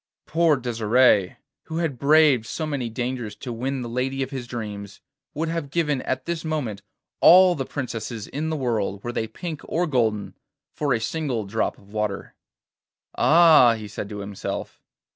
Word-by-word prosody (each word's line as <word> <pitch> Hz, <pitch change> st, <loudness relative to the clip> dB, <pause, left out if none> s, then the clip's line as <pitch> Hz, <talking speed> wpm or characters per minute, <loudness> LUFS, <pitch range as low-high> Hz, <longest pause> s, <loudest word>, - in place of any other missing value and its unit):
Poor 165 Hz, -1 st, +3 dB
Desire, 115 Hz, -4 st, +2 dB, 0.3 s
who 160 Hz, -, -5 dB
had 160 Hz, -7 st, -2 dB
braved 145 Hz, -5 st, +4 dB
so 160 Hz, -, -3 dB
many 140 Hz, -6 st, -3 dB
dangers 120 Hz, -1 st, -4 dB
to 125 Hz, -3 st, -6 dB
win 130 Hz, +3 st, -3 dB
the -, -, -5 dB
lady 130 Hz, +3 st, -2 dB
of 130 Hz, -, -7 dB
his 130 Hz, -3 st, -5 dB
dreams, 105 Hz, -4 st, -6 dB, 0.4 s
would 160 Hz, +3 st, -1 dB
have 165 Hz, -3 st, -3 dB
given 150 Hz, -3 st, 0 dB
at 130 Hz, 0 st, -3 dB
this 170 Hz, -1 st, -3 dB
moment 140 Hz, -11 st, -3 dB, 0.4 s
all 185 Hz, +1 st, +8 dB
the 135 Hz, -5 st, -4 dB
princesses 115 Hz, -5 st, -5 dB
in 155 Hz, +3 st, -4 dB
the 160 Hz, -, -2 dB
world, 110 Hz, -7 st, -2 dB
were 120 Hz, -, -3 dB
they 110 Hz, -2 st, -2 dB
pink 155 Hz, +7 st, -6 dB
or 175 Hz, +2 st, 0 dB
golden, 115 Hz, -8 st, 0 dB, 0.4 s
for 145 Hz, -2 st, -1 dB
a 120 Hz, -, +2 dB
single 125 Hz, -3 st, -2 dB
drop 110 Hz, +3 st, -2 dB
of 100 Hz, +1 st, -19 dB
water. 105 Hz, -2 st, -3 dB, 0.8 s
'Ah!' 155 Hz, -8 st, +6 dB
he 110 Hz, -1 st, -8 dB
said 100 Hz, 0 st, -6 dB
to 105 Hz, -1 st, -6 dB
himself. 100 Hz, -1 st, -6 dB
125 Hz, 170 wpm, -24 LUFS, 110-155 Hz, 0.8 s, all